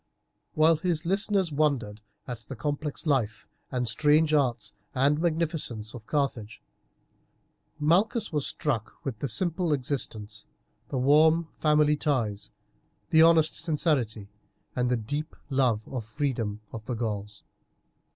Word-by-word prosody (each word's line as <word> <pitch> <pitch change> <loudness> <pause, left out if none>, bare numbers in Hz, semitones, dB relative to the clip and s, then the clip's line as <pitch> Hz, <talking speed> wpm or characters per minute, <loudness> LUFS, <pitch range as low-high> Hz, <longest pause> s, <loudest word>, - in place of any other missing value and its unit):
While 160 +1 +5
his 170 -1 -1
listeners 195 -1 +2
wondered 135 -8 0 0.3
at 120 -2 -5
the 115 +4 -9
complex 145 +5 -3
life 120 -9 0 0.2
and 125 -2 -1
strange 150 +5 +3
arts 120 -7 +1 0.2
and 145 +4 +3
magnificence 155 -10 -1
of 115 -3 -10
Carthage, 120 -8 -2 1.2
Malchus 185 +8 +2
was 150 -2 0
struck 120 -8 -2
with 125 -6 -4
the 140 - -2
simple 170 - 0
existence, 115 -6 -3 0.4
the 135 - -2
warm 155 +5 +4
family 150 -1 +3
ties, 110 -9 -1 0.6
the 160 - +6
honest 165 -1 +5
sincerity, 145 - 0 0.5
and 125 -1 +1
the 125 - +2
deep 145 +8 -4 0.2
love 125 -5 +1
of 125 -4 -4
freedom 115 -4 -3
of 110 -1 -7
the 125 - -3
Gauls. 105 -2 -4
140 Hz, 125 wpm, -27 LUFS, 115-155 Hz, 1.2 s, the